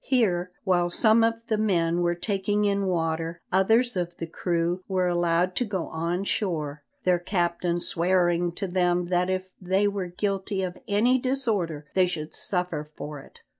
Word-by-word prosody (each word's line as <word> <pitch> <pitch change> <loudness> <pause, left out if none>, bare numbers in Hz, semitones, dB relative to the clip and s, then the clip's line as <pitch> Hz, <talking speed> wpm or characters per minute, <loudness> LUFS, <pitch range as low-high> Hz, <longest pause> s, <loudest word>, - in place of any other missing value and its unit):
Here, 185 -9 +1
while 175 -3 +2
some 220 +4 +4
of 230 0 +3
the 215 -1 0
men 175 -5 +1
were 175 0 +1
taking 205 +2 0
in 200 -1 +1
water, 165 -1 -1
others 225 +6 +3
of 175 -1 -3
the 165 - -4
crew 170 +1 -1
were 185 -2 +1
allowed 175 +1 +1
to - - +2
go 195 -6 -3
on 170 +3 -2
shore, 155 -8 -2 0.2
their 180 -1 +3
captain 175 -1 0
swearing 175 0 +2
to 200 - -3
them 175 -1 +1
that 180 0 +1
if 185 0 -2
they 190 +3 +2
were 200 -2 -2
guilty 195 +1 -2
of 180 -1 -4
any 235 +5 +3
disorder 215 - -1
they 185 -1 +4
should 160 -3 -5
suffer 180 -5 -3
for 150 -1 -6
it. - - -16
180 Hz, 170 wpm, -26 LUFS, 170-200 Hz, 0.2 s, some